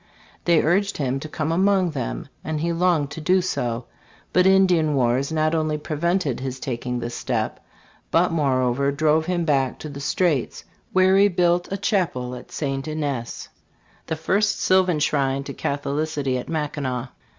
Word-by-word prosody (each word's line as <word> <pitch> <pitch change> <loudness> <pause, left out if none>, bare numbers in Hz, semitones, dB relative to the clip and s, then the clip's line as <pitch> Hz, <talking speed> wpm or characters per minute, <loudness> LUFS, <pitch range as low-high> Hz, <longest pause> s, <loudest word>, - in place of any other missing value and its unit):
They 170 -3 +4
urged 195 +5 +1
him 135 -2 -1
to 155 - -7
come 155 +1 -2
among 190 0 +2
them, - - -4 0.2
and 155 -1 -2
he 170 +2 0
longed 165 -4 +1
to 160 - -6
do 185 +4 +3
so; 125 -9 -2 0.5
but 180 +1 +5
Indian 180 -6 +4
wars 130 +2 +1
not 155 0 +1
only 155 -2 0
prevented 155 -1 -1
his 130 0 -5
taking 125 -1 -3
this 120 0 -4
step - - -2 0.5
but 175 +2 +3
moreover 135 -3 +1
drove 155 +2 +2
him 175 -2 0
back 135 -4 +1
to 155 - -7
the 140 -1 -8
Straits; 145 -1 0 0.3
where 185 0 +4
he 200 +1 +6
built 175 -1 +1
a 195 - -1
chapel, 170 - -1
at 125 - -10
St. 135 -1 -3
Ignace, 145 -6 -4 0.3
" - - -34
the 160 - -1
first 195 +6 +1
sylvan 185 -3 +3
shrine 140 -2 +1
to 140 - -7
Catholicity 145 -1 -2
at - - -8
Mackinaw.' 140 -5 -2
155 Hz, 165 wpm, -23 LUFS, 135-175 Hz, 0.5 s, he